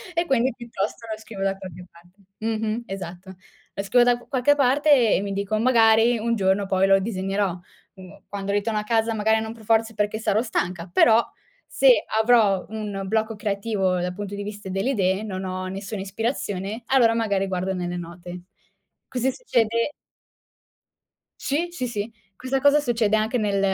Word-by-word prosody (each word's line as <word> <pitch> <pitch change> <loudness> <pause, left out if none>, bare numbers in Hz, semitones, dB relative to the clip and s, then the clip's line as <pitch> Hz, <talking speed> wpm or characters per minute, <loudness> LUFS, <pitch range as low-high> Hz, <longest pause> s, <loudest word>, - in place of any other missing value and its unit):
E 340 - +1
quindi 260 -4 +1
piuttosto 230 -1 -5
lo 215 - -4
scrivo 215 -3 -9
da 195 0 0
qualche 180 -2 -10
parte. 175 +3 -21 0.2
Mh-mh. 220 +1 -2
Esatto. 190 -1 -8 0.4
Lo 200 - -4
scrivo 240 +5 +4
da 245 0 +4
q 240 - -18
qualche 275 +1 +3
parte 275 -3 +4
e - - 0
mi 200 0 -3
dico: 200 +2 -1
"Magari 230 -1 +4
un 230 +1 0
giorno 195 -1 +1
poi 190 0 +2
lo 195 0 +5
disegnerò." 195 -2 -2 0.4
mhmm, 185 -1 -14
quando 200 -1 -4
ritorno 210 +1 0
a - - -4
casa 225 +1 +1
magari 220 +1 +2
non 220 0 -5
per 230 -1 -15
forza 225 +1 +2
è - - -18
perché 210 +1 -1
sarò 220 -1 +1
stanca, 180 -7 -3
però 225 +5 +5 0.5
se - - +4 0.2
avrò 220 -5 +4
un 210 -2 -5
blocco 220 +2 0
creativo 200 -3 -1
dal 180 0 -2
punto 205 0 -6
di 200 - -5
vista 205 -1 -7
delle 195 +8 -1
idee, 190 -4 +1
non 190 -3 -5
ho 185 0 -4
nessuna 195 +2 -5
ispirazione, 205 0 -3
allora 240 -4 +4
magari 200 -4 0
guardo 185 0 -2
nelle 180 -1 -3
note. 175 +1 -8 0.7
Così 260 +1 0
succede 230 - 0 1.5
Sì, 305 +5 -1
sì, 255 -8 -3
sì. 215 -1 -4 0.2
Questa 260 +5 -2
cosa 285 +2 +5
succede 235 -6 +1
anche 220 +3 0
nel 205 -3 0
215 Hz, 175 wpm, -24 LUFS, 195-230 Hz, 1.5 s, lo